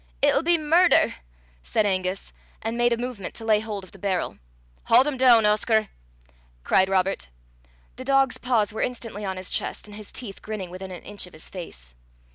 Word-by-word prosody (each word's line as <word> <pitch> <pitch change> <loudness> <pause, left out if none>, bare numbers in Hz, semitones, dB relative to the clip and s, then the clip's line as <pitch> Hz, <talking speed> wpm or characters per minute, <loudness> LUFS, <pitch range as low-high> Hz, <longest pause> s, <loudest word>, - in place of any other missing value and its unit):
"It'll - - +5
be 340 +1 +3
murder," 330 +4 +4 0.5
said 210 - 0
Angus, 185 -1 -2 0.3
and 225 +1 -2
made 240 0 +2
a 235 - +2
movement 240 -5 -5
to 225 - -8
lay 215 -1 +4
hold 210 -2 -5
of 185 - -14
the 195 - -15
barrel. 190 -2 -2 0.5
"Haud 245 +3 +6
him 295 -2 -1
doon, 245 -4 +6
Oscar," 215 0 +2 0.7
cried 190 0 +3
Robert. 190 - 0 0.7
The 255 - -6
dog's 270 -1 +2
paws 225 -4 +1
were 220 - -3
instantly 230 -4 -4
on 190 -1 -3
his 185 0 -5
chest, - - -3
and 205 - -11
his 210 -1 -11
teeth 215 -6 -9
grinning 205 -5 -5
within 185 +1 -7
an 180 - -9
inch 205 -3 -5
of - - -17
his 155 - -11
face. 60 - -8
210 Hz, 190 wpm, -25 LUFS, 190-240 Hz, 0.7 s, Haud